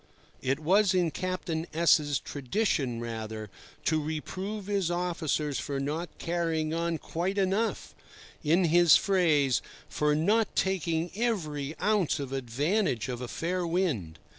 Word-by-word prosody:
It 135 Hz, +2 st, 0 dB
was 190 Hz, +5 st, +3 dB
in 175 Hz, -3 st, +2 dB
Captain 180 Hz, -2 st, -3 dB
S—'s 150 Hz, -4 st, +4 dB
tradition 135 Hz, -, -1 dB
rather 110 Hz, -2 st, -5 dB, 0.3 s
to 155 Hz, -1 st, +2 dB
reprove 185 Hz, +7 st, -4 dB
his 200 Hz, -4 st, 0 dB
officers 165 Hz, -5 st, -1 dB
for 140 Hz, -1 st, -3 dB
not 155 Hz, +5 st, -2 dB
carrying 165 Hz, -2 st, -1 dB
on 170 Hz, 0 st, 0 dB
quite 180 Hz, +6 st, -3 dB
enough—in 190 Hz, -4 st, -1 dB
his 170 Hz, 0 st, +6 dB
phrase 160 Hz, -9 st, +3 dB, 0.3 s
"for 150 Hz, 0 st, +1 dB
not 205 Hz, +8 st, +2 dB
taking 170 Hz, -3 st, 0 dB
every 160 Hz, -, -2 dB
ounce 205 Hz, -8 st, +1 dB
of 135 Hz, -1 st, -5 dB
advantage 135 Hz, -, 0 dB
of 125 Hz, -1 st, -4 dB
a 125 Hz, -, -4 dB
fair 180 Hz, +7 st, -2 dB
wind." 155 Hz, -, -1 dB
165 Hz, 125 wpm, -29 LUFS, 145-185 Hz, 0.3 s, his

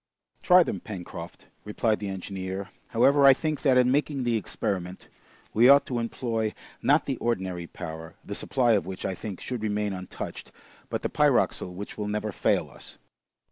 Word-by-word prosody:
"Try 180 Hz, 0 st, +7 dB
them, -, -, -3 dB
Pencroft," 90 Hz, -4 st, -8 dB, 0.2 s
replied 105 Hz, +1 st, 0 dB
the 100 Hz, -, -4 dB
engineer. 95 Hz, 0 st, -5 dB, 0.2 s
"However, 140 Hz, +5 st, +4 dB
I 135 Hz, -1 st, +9 dB
think 155 Hz, +2 st, -2 dB
that 135 Hz, -4 st, +4 dB
in 125 Hz, 0 st, +4 dB
making 140 Hz, -1 st, 0 dB
the 120 Hz, -1 st, +1 dB
experiment, 95 Hz, -4 st, -3 dB, 0.5 s
we 120 Hz, +4 st, +6 dB
ought 140 Hz, 0 st, +7 dB
to 125 Hz, -2 st, -2 dB
employ, 115 Hz, -2 st, -2 dB, 0.3 s
not 145 Hz, +2 st, +3 dB
the 135 Hz, -3 st, -2 dB
ordinary 95 Hz, -7 st, -2 dB
powder, 80 Hz, -2 st, -8 dB
the -, -, -5 dB
supply 125 Hz, -3 st, +1 dB
of 100 Hz, -6 st, +2 dB
which, 95 Hz, -1 st, -5 dB
I -, -, -1 dB
think, 95 Hz, +1 st, -6 dB
should 125 Hz, -3 st, -4 dB
remain 105 Hz, -1 st, -1 dB
untouched, 95 Hz, -1 st, -7 dB, 0.4 s
but -, -, -2 dB
the -, -, 0 dB
pyroxyle 90 Hz, -, +2 dB
which 100 Hz, +3 st, -7 dB
will 105 Hz, -, -2 dB
never 105 Hz, +1 st, -2 dB
fail -, -, +1 dB
us." -, -, -10 dB
105 Hz, 175 wpm, -27 LUFS, 95-125 Hz, 0.5 s, I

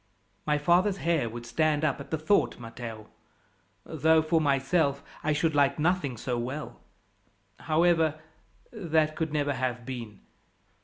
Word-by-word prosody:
"My 150 Hz, 0 st, +3 dB
father's 180 Hz, +6 st, +3 dB
hair 165 Hz, -10 st, 0 dB
would 120 Hz, +1 st, -8 dB
stand 150 Hz, +5 st, +1 dB
up 140 Hz, -2 st, 0 dB
at 140 Hz, 0 st, -9 dB
the 160 Hz, -, -1 dB
thought, 155 Hz, +7 st, +1 dB
Matteo; 115 Hz, -2 st, -8 dB, 0.8 s
though, 160 Hz, +1 st, +3 dB
for 160 Hz, +1 st, +2 dB
myself, 140 Hz, 0 st, +1 dB, 0.2 s
I 155 Hz, -, +1 dB
should 155 Hz, +1 st, +1 dB
like 140 Hz, -1 st, +3 dB
nothing 155 Hz, -5 st, 0 dB
so 120 Hz, +2 st, -2 dB
well. 130 Hz, +6 st, -5 dB, 0.8 s
However, 160 Hz, -1 st, +2 dB, 0.5 s
that 160 Hz, -7 st, +1 dB
could 160 Hz, -2 st, -2 dB
never 145 Hz, -1 st, 0 dB
have 125 Hz, -2 st, -3 dB
been. 115 Hz, -5 st, -7 dB
150 Hz, 140 wpm, -28 LUFS, 130-160 Hz, 0.8 s, My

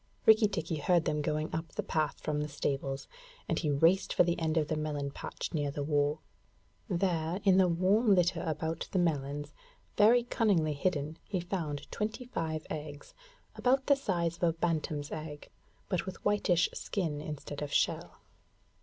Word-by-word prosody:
Rikki 220 Hz, 0 st, +7 dB
tikki 165 Hz, -5 st, -3 dB
heard 170 Hz, +3 st, +2 dB
them 150 Hz, 0 st, 0 dB
going 155 Hz, +1 st, -2 dB
up 160 Hz, 0 st, -4 dB
the -, -, -2 dB
path 155 Hz, -1 st, -1 dB
from 150 Hz, -1 st, -1 dB
the 150 Hz, -, -2 dB
stables, 135 Hz, -1 st, -2 dB, 0.4 s
and -, -, 0 dB
he 155 Hz, -, -1 dB
raced 165 Hz, +7 st, +3 dB
for -, -, +6 dB
the 170 Hz, 0 st, 0 dB
end 160 Hz, -1 st, 0 dB
of 155 Hz, -2 st, +2 dB
the 155 Hz, -, -1 dB
melon 150 Hz, -2 st, -2 dB
patch -, -, -6 dB
near 145 Hz, -3 st, 0 dB
the 145 Hz, +1 st, -3 dB
wall. 145 Hz, +1 st, +1 dB, 0.7 s
There, 175 Hz, -2 st, 0 dB
in 190 Hz, -2 st, +5 dB
the 185 Hz, -, +5 dB
warm 195 Hz, +5 st, +3 dB
litter 175 Hz, -1 st, +2 dB
about 160 Hz, 0 st, -3 dB
the -, -, 0 dB
melons, 145 Hz, -3 st, -1 dB, 0.4 s
very 230 Hz, +4 st, +6 dB
cunningly 200 Hz, -10 st, +2 dB
hidden, 150 Hz, 0 st, -1 dB
he 190 Hz, -, -2 dB
found 160 Hz, -5 st, -3 dB
twenty 220 Hz, +3 st, -3 dB
five 160 Hz, -9 st, -3 dB
eggs, 150 Hz, -2 st, -7 dB, 0.4 s
about 265 Hz, +1 st, +2 dB
the 280 Hz, -, +5 dB
size 170 Hz, -10 st, -1 dB
of -, -, -9 dB
a 165 Hz, -1 st, +4 dB
bantam's 155 Hz, -3 st, -2 dB
eggs, 155 Hz, -1 st, -7 dB, 0.4 s
but 185 Hz, -1 st, -1 dB
with 190 Hz, -, -4 dB
whitish 195 Hz, -4 st, +3 dB
skin 160 Hz, -7 st, -2 dB
instead 150 Hz, -1 st, -6 dB
of 145 Hz, -1 st, -4 dB
shell. -, -, 0 dB
160 Hz, 170 wpm, -31 LUFS, 150-185 Hz, 0.7 s, Rikki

